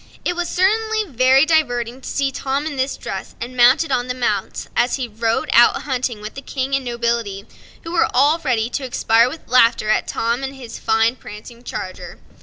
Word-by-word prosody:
It 355 - 0
was 350 0 -2
certainly 435 +3 +1
very 260 - +4
amusing 255 -6 0
to - - -7
see 275 -1 -1
him 275 +2 -2
in 310 -2 -4
this 265 +1 -2
dress - - -7
and 250 +2 -6
mounted 255 +6 +4
on 250 -1 0
the 250 - -3
mouse, 210 -6 -2
as 245 - +2
he 260 -3 -3
rode 225 +1 -1
out 240 0 +6
a - - -6
hunting 250 -5 -3
with 210 +1 -7
the 275 - -8
King 270 0 -4
and 275 - -1
nobility, 235 -4 -2 0.4
who 330 - -7
were 345 - +2
all 290 +6 +3
ready 240 -7 0
to 280 - -3
expire 235 -2 +2
with 315 +4 -10
laughter 230 -3 +3
at 215 - +1
Tom 235 +3 -1
and 270 0 -5
his 245 -4 -9
fine 225 +2 +1
prancing 230 +3 -11
charioteer. 185 -6 -7
250 Hz, 205 wpm, -20 LUFS, 235-275 Hz, 0.4 s, out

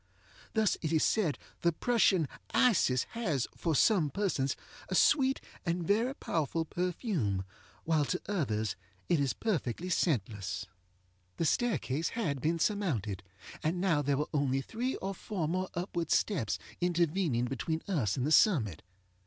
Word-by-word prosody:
Thus 220 -2 +3
it 155 - -2
is 160 -2 +3
said 185 -10 +2 0.2
the 170 - +3
Prussian 190 - +3 0.3
Isis 175 - +4
has, 165 - -1
for 165 -3 0
some 175 - +4
persons, 140 -6 0 0.3
a - - -1
sweet 270 -2 +4 0.2
and 170 -1 -1
very 230 +8 +2
powerful 160 - -1
perfume, 170 - -1 0.4
while 155 -3 +2
to 180 - -1
others 110 - -1 0.3
it 170 - +3
is 140 -2 +1
perfectly 175 - -2
scentless. 110 - -1 0.7
The 165 - 0
staircase 160 - +1
had 150 - -2
been 165 +4 +1
surmounted, 145 - 0 0.4
and 175 +4 -1
there 145 -7 +2
were 150 - 0
now 150 - +2
only 135 -1 +1
three 240 - -3
or 195 +1 -4
four 185 -3 -3
more 185 +3 -1
upward 175 -2 -2
steps 150 - +1 0.2
intervening 170 -7 +1
between 135 +6 -2
us 130 - 0
and 130 - 0
the 150 - 0
summit. 125 - +4
165 Hz, 145 wpm, -31 LUFS, 135-195 Hz, 0.7 s, Isis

